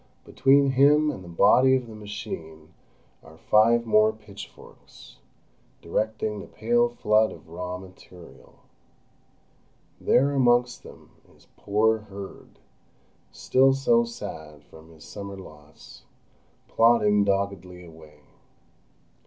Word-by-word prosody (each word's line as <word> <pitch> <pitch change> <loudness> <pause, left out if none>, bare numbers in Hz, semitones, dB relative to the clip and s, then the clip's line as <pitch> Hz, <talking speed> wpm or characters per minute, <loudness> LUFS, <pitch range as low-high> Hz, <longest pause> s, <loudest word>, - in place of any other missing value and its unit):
Between 135 +1 +2
him 145 +3 +3
and 95 -10 -10
the - - -13
body 130 +9 +4
of 130 -1 -2
the 115 - -12
machine 85 -7 -9 0.5
are 80 0 -16
five 115 +6 +2
more 110 -1 +3
pitch 105 -2 -12
forks, - - -18 0.6
directing 105 +3 -3
the 100 - -10
pale 120 +2 0
flood 110 -2 +1
of - - -14
raw 90 +2 -6
material. 90 -2 -16 1.4
There, 140 +3 +2
amongst 125 -2 +1
them, - - -16 0.2
is - - -25
poor 110 +2 0
Herd, 100 -2 -12 0.7
still 135 +1 +2
so 235 - +2
sad 80 - -9
from 80 0 -17
his 80 -2 -17
summer 100 -1 -9
loss, 75 -5 -15 0.7
plodding 105 -3 +3
doggedly 95 -3 -3
away. 80 -2 -17
105 Hz, 110 wpm, -24 LUFS, 90-120 Hz, 1.4 s, body